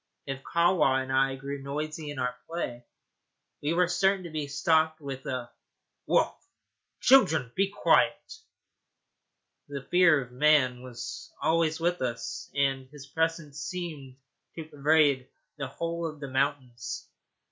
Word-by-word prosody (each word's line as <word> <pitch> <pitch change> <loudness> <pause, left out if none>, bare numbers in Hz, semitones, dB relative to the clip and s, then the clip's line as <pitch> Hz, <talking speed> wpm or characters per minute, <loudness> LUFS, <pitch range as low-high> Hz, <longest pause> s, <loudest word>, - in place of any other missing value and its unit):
If 135 -1 -5
Kahwa 170 -6 +3
and 130 - -6
I 135 0 +3
grew 140 +1 -6
noisy 150 +2 -4
in 145 - -6
our 125 -1 -1
play, 120 -8 -4 0.8
we 150 +3 0
were 180 0 +4
certain 190 +2 +2
to 170 - -8
be 155 -2 -3
stopped 155 +2 +2
with 135 -3 -7
a 125 -2 -4 0.6
'Woof, - - +3 0.7
children! 170 - +5
be 195 +1 +2
quiet.' 320 - +2 1.3
The 140 -2 -6
fear 175 -4 +6
of 125 -2 -7
man 130 -2 +3
was 125 -2 -8
always 160 -1 +1
with 175 +1 0
us, 120 -2 -4
and 135 -2 0
his 145 -1 -11
presence 160 0 -2
seemed 150 -5 -6 0.4
to 165 - -5
pervade 145 -3 +3 0.3
the 135 - -2
whole 170 +4 -3
of 155 -2 -8
the 140 -2 -6
mountains. 130 -3 -2
145 Hz, 135 wpm, -28 LUFS, 135-165 Hz, 1.3 s, fear